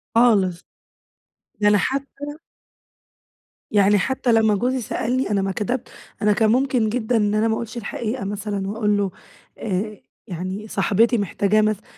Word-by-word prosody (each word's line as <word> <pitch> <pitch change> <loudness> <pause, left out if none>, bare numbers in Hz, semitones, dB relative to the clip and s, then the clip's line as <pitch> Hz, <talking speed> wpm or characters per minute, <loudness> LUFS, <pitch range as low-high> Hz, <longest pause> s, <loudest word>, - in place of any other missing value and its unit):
خالص. 200 -7 +3 1.0
ده 205 - +4
أنا 205 - +5
حتّى 280 +4 -3 1.3
يعني 205 0 +4
حتّى 255 +3 0
لمّا 220 -2 +4
جوزي 250 +4 0
سألني، 250 +3 -1
أنا 200 - +2
ما 195 0 -1
كدبت 215 +6 -3 0.3
أنا 210 -1 +4
كان 220 +1 +2
ممكن 255 -3 +2
جدًا 235 +1 0
إن 210 -1 +1
أنا 215 +1 +2
ما 225 - +1
أقولش 235 +1 -6
الحقيقة 235 +1 -4
مثلًا، 200 -1 -3
وأقول 210 0 0
له 200 -2 0 0.5
آآ 210 +1 -3 0.3
يعني 185 +3 -5
صاحبتي 230 +3 +2
محتاجاه 205 +1 +1
مثلًا. 215 -1 0
215 Hz, 145 wpm, -22 LUFS, 205-235 Hz, 1.3 s, أنا